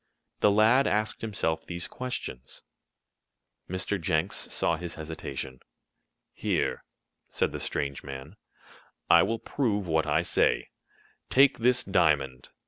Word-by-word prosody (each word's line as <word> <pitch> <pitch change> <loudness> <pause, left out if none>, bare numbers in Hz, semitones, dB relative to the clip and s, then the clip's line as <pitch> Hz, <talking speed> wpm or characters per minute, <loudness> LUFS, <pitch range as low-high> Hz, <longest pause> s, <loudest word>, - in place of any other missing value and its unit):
The - - +5
lad 110 +6 +5
asked 105 +1 0
himself 100 -7 -1
these 85 -1 -3
questions. 95 - -6 1.1
Mr. 95 +1 -2
Jenks 80 -1 0
saw 85 - 0
his 85 +1 -6
hesitation. 70 -5 -6 0.7
"Here," - - -1 0.5
said - - 0
the - - -5
strange 70 -1 -3
man, 70 +5 -8 0.8
"I 85 - +8
will 115 - 0
prove 110 -5 -1
what 80 -2 +1
I - - +2
say. - - +2 0.6
Take 135 -1 +5
this 125 +1 +3
diamond. 75 -8 +1
85 Hz, 120 wpm, -28 LUFS, 75-110 Hz, 1.1 s, I